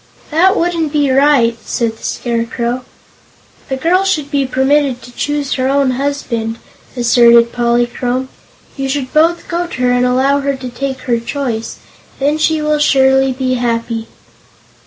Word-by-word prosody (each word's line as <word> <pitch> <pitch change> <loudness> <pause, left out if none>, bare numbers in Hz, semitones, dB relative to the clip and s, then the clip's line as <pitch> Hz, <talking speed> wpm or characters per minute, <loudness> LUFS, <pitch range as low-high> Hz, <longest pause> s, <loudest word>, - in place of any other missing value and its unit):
"That 370 +6 +3
wouldn't 335 -3 0
be 290 -3 +1
right," 270 -4 +3
said 230 -2 -2
the - - -21
Scarecrow. 235 +1 -3 0.8
"The 265 - -2
girl 355 +7 +2
should 310 -7 -1
be 275 -2 0
permitted 265 0 +1
to 245 - -12
choose 290 +2 -2
her 260 -1 0
own 275 -1 +2
husband," 245 -4 -3 0.4
asserted 235 -1 +5
Polychrome. 240 +1 0 0.5
"You 270 -1 -3
should 265 -2 -3
both 330 +3 +2
go 345 0 -2
to 260 - -7
her 250 - +3
and 245 0 +2
allow 260 +3 +2
her 280 0 -1
to 260 -1 -7
take 265 +1 -4
her 240 -2 0
choice. 235 -2 -4 0.4
Then 290 +3 0
she 310 0 +1
will 300 0 +1
surely 265 -2 +3
be 255 0 -1
happy." 230 -1 -2
265 Hz, 155 wpm, -15 LUFS, 240-290 Hz, 0.8 s, asserted